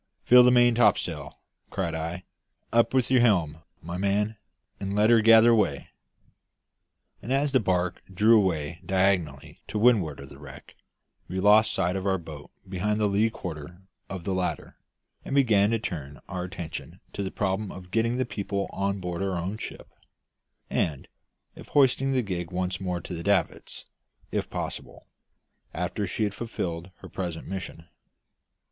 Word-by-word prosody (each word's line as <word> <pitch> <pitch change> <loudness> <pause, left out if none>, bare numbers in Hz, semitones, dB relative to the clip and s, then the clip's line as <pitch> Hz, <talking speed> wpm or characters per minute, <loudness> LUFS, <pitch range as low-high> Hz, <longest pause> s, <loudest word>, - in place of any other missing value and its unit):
"Fill 125 0 +8
the 125 - +6
main 120 -1 +5
topsail," 115 -1 +1 0.3
cried 90 -4 -2
I. 85 +3 -4 0.5
"Up 115 0 +4
with 130 -1 +1
your 130 -2 +5
helm, 85 -10 +2 0.2
my 85 +2 -5
man, 105 +2 0 0.4
and 100 0 -3
let 105 +2 +4
her 115 -1 +6
gather 115 +1 +7
way." 100 -11 0 1.3
And 120 - -6
as 140 +1 +2
the 130 - +4
barque 90 -4 0
drew 105 +5 +5
away 85 -5 0
diagonally 95 -7 0
to - - -4
windward 105 - +3
of 70 0 -10
the 70 - -13
wreck, 70 -2 -12 0.5
we 95 - -3
lost 105 +3 +5
sight 90 +2 0
of 95 +1 -2
our 95 -1 +2
boat 80 -4 -10 0.2
behind 100 +3 -1
the 105 - +2
lee 105 +2 +2
quarter 85 -2 -8 0.3
of 95 -3 -6
the 95 - -2
latter, 95 -1 -3 0.5
and 140 - -4
began 110 -7 +4
to 115 - +2
turn 75 -10 -6
our 90 -2 -4
attention 85 -3 -7
to - - -4
the 95 - -2
problem 100 +1 -2
of 90 -1 -11
getting 115 +3 +1
the 130 - 0
people 100 -1 -3
on 100 0 -1
board 90 -1 -4
our 95 -2 -1
own 90 +5 -3
ship, - - -8 0.8
and 75 -5 -1 0.5
of - - -12
hoisting 135 -1 +3
the 130 -2 +1
gig 90 -4 -4
once 90 0 -3
more 90 -2 -2
to 90 - -8
the 85 - -5
davits, 95 -2 -1 0.5
if - - -2
possible, - - -6 0.7
after 90 +4 -2
she 110 - -2
had 105 -1 -1
fulfilled 90 -6 -4
her - - -9
present 85 -3 -5
mission. 95 -3 -6
95 Hz, 165 wpm, -26 LUFS, 85-110 Hz, 1.3 s, Fill